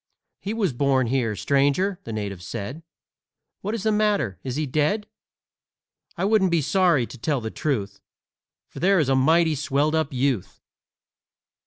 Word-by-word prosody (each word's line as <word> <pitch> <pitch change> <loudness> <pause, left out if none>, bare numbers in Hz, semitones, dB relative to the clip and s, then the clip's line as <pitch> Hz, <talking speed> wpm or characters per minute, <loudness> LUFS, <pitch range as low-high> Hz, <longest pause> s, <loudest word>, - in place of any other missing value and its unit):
"He 205 +3 -4
was 200 - 0
born 135 0 +2
here, 115 -3 0
stranger," 145 - +1
the 115 - -6
native 100 -4 -4
said. 100 - -6 0.8
"What 210 +3 -2
is 215 - -5
the 220 - +2
matter? 210 - +1
Is 130 -2 -4
he 155 +1 -1
dead? 155 +10 0 1.1
I 180 - 0
wouldn't 205 -2 +3
be 170 -1 +2
sorry, 175 -7 +3
to 130 - -12
tell 145 +3 0
the 110 -1 -5
truth, 105 -9 -3 0.7
For - - -11
there 195 +2 +3
is 150 -6 +2
a 135 - +3
mighty 160 +5 +4
swelled 145 +1 0
up 160 -2 0
youth! 130 -6 -1
145 Hz, 160 wpm, -24 LUFS, 125-185 Hz, 1.1 s, mighty